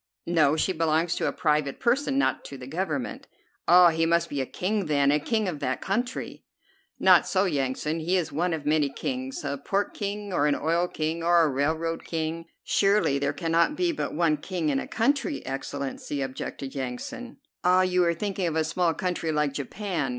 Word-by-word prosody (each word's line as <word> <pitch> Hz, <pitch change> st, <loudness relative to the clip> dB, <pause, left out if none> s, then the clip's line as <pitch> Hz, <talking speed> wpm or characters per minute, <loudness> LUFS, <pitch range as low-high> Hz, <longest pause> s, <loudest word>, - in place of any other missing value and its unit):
"No, 155 Hz, -4 st, +3 dB
she 190 Hz, -, +1 dB
belongs 165 Hz, +1 st, +1 dB
to -, -, 0 dB
a -, -, +1 dB
private 150 Hz, -3 st, 0 dB
person, 270 Hz, +3 st, +1 dB
not 280 Hz, -, +1 dB
to 140 Hz, -, -8 dB
the 130 Hz, -, -9 dB
Government." 155 Hz, -2 st, -3 dB, 0.4 s
"Ah, 175 Hz, 0 st, +8 dB
he 165 Hz, 0 st, +1 dB
must 170 Hz, 0 st, +2 dB
be 140 Hz, -2 st, -1 dB
a 130 Hz, -, -3 dB
king, 200 Hz, 0 st, -2 dB
then, 140 Hz, -2 st, +3 dB
a 150 Hz, -, +3 dB
king 215 Hz, +7 st, 0 dB
of 160 Hz, -5 st, -3 dB
that 130 Hz, -1 st, -1 dB
country." 240 Hz, +6 st, -3 dB, 0.6 s
"Not -, -, +6 dB
so, 190 Hz, +1 st, +2 dB
Yansan; 150 Hz, 0 st, -1 dB
he 170 Hz, +4 st, 0 dB
is 175 Hz, -, -2 dB
one 175 Hz, +4 st, 0 dB
of 155 Hz, -3 st, -3 dB
many 150 Hz, -1 st, +2 dB
kings, 130 Hz, 0 st, -4 dB
a 140 Hz, -1 st, -3 dB
pork 195 Hz, +8 st, -1 dB
king, 205 Hz, -1 st, -4 dB
or 150 Hz, -4 st, +2 dB
an 145 Hz, -, +2 dB
oil 170 Hz, +3 st, +1 dB
king 160 Hz, 0 st, -3 dB
or 170 Hz, 0 st, +4 dB
a 155 Hz, -, +2 dB
railroad 160 Hz, +4 st, -1 dB
king." 165 Hz, 0 st, -3 dB, 0.2 s
"Surely 195 Hz, -8 st, +2 dB
there 140 Hz, -, 0 dB
cannot 170 Hz, -, +1 dB
be 355 Hz, 0 st, +1 dB
but 300 Hz, -, -4 dB
one 160 Hz, -2 st, +2 dB
king 175 Hz, -4 st, -2 dB
in 135 Hz, -2 st, +1 dB
a -, -, -5 dB
country, 280 Hz, +6 st, 0 dB
Excellency," 140 Hz, +1 st, -4 dB
objected 135 Hz, 0 st, -6 dB
Yansan. 135 Hz, -, -6 dB, 0.3 s
"Ah, 185 Hz, +1 st, +5 dB
you 180 Hz, -1 st, +2 dB
are 170 Hz, -1 st, +2 dB
thinking 195 Hz, 0 st, -2 dB
of 160 Hz, -, -2 dB
a 160 Hz, -, +2 dB
small 165 Hz, +1 st, 0 dB
country 180 Hz, -3 st, -2 dB
like 150 Hz, -2 st, 0 dB
Japan. 155 Hz, +1 st, -3 dB
165 Hz, 195 wpm, -26 LUFS, 145-185 Hz, 0.6 s, Ah